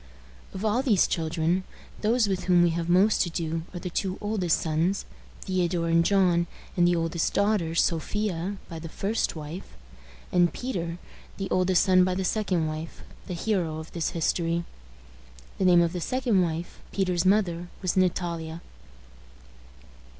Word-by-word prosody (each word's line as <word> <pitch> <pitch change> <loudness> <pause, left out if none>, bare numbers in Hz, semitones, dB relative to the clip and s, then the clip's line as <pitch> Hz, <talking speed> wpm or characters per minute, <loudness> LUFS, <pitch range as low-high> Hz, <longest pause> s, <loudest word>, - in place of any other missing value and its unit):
Of 190 +3 -5
all 220 +4 +2
these 225 -9 +3
children, 165 +2 0 0.4
those 225 +1 +3
with 190 -2 -2
whom 180 -1 +5
we 170 - +3
have 170 +1 -2
most 190 +5 +4
to 175 - +1
do 165 -1 -2
are 180 - -7
the 180 +1 -5
two 190 +1 -2
oldest 205 -5 0
sons, 165 +5 0 0.4
Theodore 175 -3 0
and 165 0 +4
John, 180 -3 +3 0.3
and 175 -1 +4
the 175 - +3
oldest 165 0 -1
daughter, 200 -5 +1
Sophia, 185 +3 0
by 165 -2 -7
the 165 0 -7
first 205 +5 -1
wife; 155 - -8 0.6
and 175 -1 +4
Peter, 175 -10 -4 0.4
the 195 -1 -4
oldest 185 0 +3
son 185 -1 +5
by 185 0 +1
the 190 0 -1
second 185 -6 0
wife, 155 +1 -6 0.2
the 180 - -4
hero 170 -4 -1
of 160 +1 -8
this 170 -2 -1
history. 170 0 0 1.0
The 190 - +2
name 175 -1 +6
of 170 0 -1
the 180 - -3
second 245 -3 +1
wife, 170 0 -3
Peter's 180 -3 0
mother, 185 -3 +2 0.2
was 185 - 0
Natalia. 170 -3 -1
175 Hz, 155 wpm, -27 LUFS, 165-195 Hz, 1.0 s, name